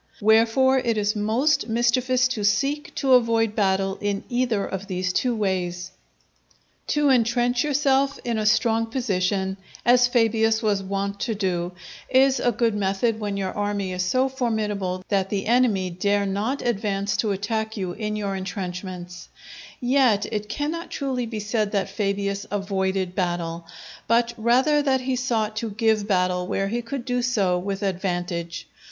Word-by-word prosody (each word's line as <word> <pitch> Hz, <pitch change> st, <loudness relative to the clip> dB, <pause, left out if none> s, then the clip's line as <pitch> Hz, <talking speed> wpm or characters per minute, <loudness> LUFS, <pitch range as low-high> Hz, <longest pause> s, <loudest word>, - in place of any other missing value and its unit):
Wherefore 230 Hz, +5 st, +4 dB
it 230 Hz, -3 st, 0 dB
is 210 Hz, +1 st, 0 dB
most 230 Hz, +6 st, +1 dB
mischievous 250 Hz, +2 st, +2 dB
to 220 Hz, -4 st, -3 dB
seek 275 Hz, +9 st, 0 dB
to 270 Hz, -2 st, +2 dB
avoid 230 Hz, -3 st, +3 dB
battle 195 Hz, -1 st, +1 dB
in 205 Hz, -1 st, -1 dB
either 240 Hz, -5 st, 0 dB
of 195 Hz, +1 st, -5 dB
these 185 Hz, -1 st, -2 dB
two 245 Hz, +3 st, +1 dB
ways. 180 Hz, -3 st, -2 dB, 1.0 s
To 295 Hz, -1 st, +2 dB
intrench 245 Hz, 0 st, +2 dB
yourself 275 Hz, -1 st, +2 dB
in 235 Hz, -2 st, -1 dB
a 215 Hz, -, 0 dB
strong 225 Hz, 0 st, +2 dB
position, 195 Hz, -5 st, -1 dB, 0.3 s
as 245 Hz, 0 st, +5 dB
Fabius 225 Hz, -2 st, +2 dB
was 205 Hz, -2 st, +1 dB
wont 200 Hz, +1 st, -3 dB
to 225 Hz, 0 st, -2 dB
do, 180 Hz, -3 st, -2 dB, 0.4 s
is 265 Hz, +1 st, +4 dB
a 245 Hz, -, +2 dB
good 230 Hz, 0 st, +1 dB
method 205 Hz, +3 st, 0 dB
when 205 Hz, -2 st, -3 dB
your 190 Hz, -1 st, -2 dB
army 205 Hz, -2 st, -2 dB
is 180 Hz, -, -2 dB
so 255 Hz, +9 st, +2 dB
formidable 210 Hz, -8 st, -2 dB
that 195 Hz, -2 st, +1 dB
the 195 Hz, -1 st, -2 dB
enemy 215 Hz, -6 st, +2 dB
dare 200 Hz, +3 st, +1 dB
not 210 Hz, +8 st, -2 dB
advance 205 Hz, -3 st, -1 dB
to 220 Hz, -, 0 dB
attack 220 Hz, +3 st, -2 dB
you 185 Hz, -3 st, -2 dB
in 210 Hz, +2 st, -4 dB
your 200 Hz, -2 st, -2 dB
intrenchments; 180 Hz, -2 st, -6 dB, 0.5 s
yet 245 Hz, -5 st, +3 dB
it 210 Hz, -1 st, -3 dB
cannot 305 Hz, +7 st, -3 dB
truly 260 Hz, -4 st, -2 dB
be 220 Hz, -1 st, -5 dB
said 210 Hz, 0 st, -1 dB
that 195 Hz, -2 st, -1 dB
Fabius 200 Hz, -1 st, -2 dB
avoided 190 Hz, -2 st, -1 dB
battle, 175 Hz, -2 st, -2 dB, 0.4 s
but 235 Hz, +1 st, +2 dB
rather 255 Hz, +6 st, +3 dB
that 265 Hz, -2 st, +1 dB
he 255 Hz, 0 st, -1 dB
sought 225 Hz, -4 st, -1 dB
to 225 Hz, +1 st, -2 dB
give 215 Hz, 0 st, +1 dB
battle 180 Hz, -2 st, +1 dB
where 195 Hz, +1 st, -1 dB
he 240 Hz, +3 st, -1 dB
could 240 Hz, +1 st, -5 dB
do 245 Hz, -1 st, 0 dB
so 200 Hz, -8 st, +1 dB
with 195 Hz, +2 st, -4 dB
advantage. 175 Hz, -3 st, -3 dB
210 Hz, 160 wpm, -24 LUFS, 195-240 Hz, 1.0 s, as